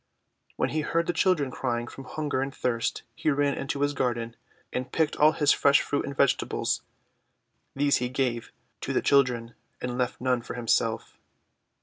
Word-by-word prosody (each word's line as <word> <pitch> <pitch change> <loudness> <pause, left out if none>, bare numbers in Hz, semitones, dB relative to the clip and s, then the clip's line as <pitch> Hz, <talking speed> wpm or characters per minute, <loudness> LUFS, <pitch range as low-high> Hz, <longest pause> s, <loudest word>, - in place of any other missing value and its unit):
When - - 0
he 155 - -1
heard 165 +2 0
the 175 - 0
children 165 -6 +2
crying 120 -2 -2
from 135 - -10
hun 155 +3 -4
ger 130 - +1
and 135 +1 -2
thirst 120 -3 -2
he 155 - -1
ran 145 -1 +2
into 140 +1 -3
his 145 0 +2
garden 120 -3 -2 0.4
and 125 0 -3
picked 160 -2 +1
all 155 +1 +6
his 145 -3 +3
fresh 140 0 +5
fruit 145 - -1
and 140 -1 -6
vegetables. 140 -2 +1 0.9
These 140 +1 +3
he 125 0 -2
gave 125 -3 -1 0.3
to - - -3
the - - +1
children, 125 -4 +2 0.3
and 125 0 -4
left 125 -1 -1
none 125 -1 +1
for 120 - -7
himself. 115 -1 0
135 Hz, 180 wpm, -27 LUFS, 120-145 Hz, 0.9 s, all